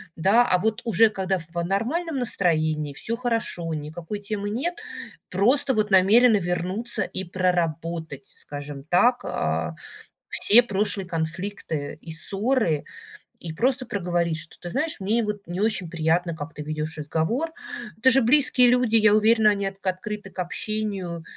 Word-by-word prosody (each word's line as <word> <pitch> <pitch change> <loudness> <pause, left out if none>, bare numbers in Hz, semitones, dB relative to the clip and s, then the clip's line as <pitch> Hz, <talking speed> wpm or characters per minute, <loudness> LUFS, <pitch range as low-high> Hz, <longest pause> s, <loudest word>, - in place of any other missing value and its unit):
да. 205 +9 +4
А 180 - +3
вот, 220 +5 -1
уже 225 -1 +4
когда 190 -2 -1
в 170 +1 -5
нормальном 270 - -1
настроении, 155 - 0
всё 225 +10 -4
хорошо, 230 -8 -2
никакой 160 +6 -6
темы 205 0 -4
нет, 275 +12 -2 0.5
просто 255 +8 +2
вот 210 -1 0
намерены 210 +5 +6
вернуться 185 +5 0
и 190 - -4
проработать, 170 -5 -2
скажем 145 -1 -8
так, 235 - +3
а, - - -2 0.5
все 235 +4 +6
прошлые 205 -2 -1
конфликты 165 -2 -4
и 165 - -9
ссоры. 195 - 0 0.5
И 165 - -6
просто 255 +7 +1
проговорить, 175 -4 -1
что, 160 0 -10
ты 175 - -7
знаешь, 305 - -2
мне 220 +5 0
вот 210 -3 -5
не 175 +3 -4
очень 210 -5 0
приятно, 165 +1 0
как 155 +1 -7
ты - - -8
ведешь 155 +1 -4
разговор. 160 - -1 0.5
Это 260 +4 +4
же 270 +2 +4
близкие 255 0 +5
люди, 245 -2 +3
я 215 -1 +5
уверена, 215 0 +4
они 200 -1 -2
отк 195 0 -6
открыты 190 +2 -4
к 190 - -12
общению. 190 -2 -3
195 Hz, 150 wpm, -24 LUFS, 165-225 Hz, 0.5 s, намерены